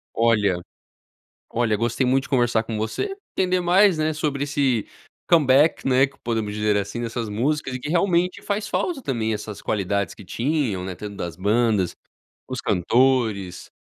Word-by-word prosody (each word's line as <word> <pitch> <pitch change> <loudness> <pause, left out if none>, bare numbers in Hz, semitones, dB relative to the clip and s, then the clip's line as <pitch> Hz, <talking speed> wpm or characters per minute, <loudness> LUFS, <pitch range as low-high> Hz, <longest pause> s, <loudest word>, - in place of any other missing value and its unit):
Olha 105 -6 +2 0.9
olha, 115 -3 +1
gostei 120 +3 0
muito 130 +2 +2
de - - -11
conversar 120 -4 +2
com 110 -1 -4
você, 110 - -2 0.2
entender 185 -1 +1
mais, 180 0 +4
né, 155 0 +1
sobre 145 -2 -1
esse 140 -6 0 0.4
comeback, 150 -2 +4
né, 130 +1 +5
que 140 - -15
podemos 110 -3 -2
dizer, 105 0 +1
assim, 100 +4 -2
dessas 115 -1 -3
músicas 135 +5 -1
e 130 - -4
que 145 - -6
realmente 180 +1 +1
faz 205 +1 -2
falta 305 +5 -1
também 115 - -1
essas 105 -1 -6
qualidades 100 -2 -1
que 105 - -13
tinham, 120 - -1
né, 95 - -4
dentro 100 +3 -8
das 85 -3 -5
bandas, 105 -2 +1 0.5
os - - -4
cantores, 110 -3 +1
120 Hz, 160 wpm, -23 LUFS, 105-150 Hz, 0.9 s, né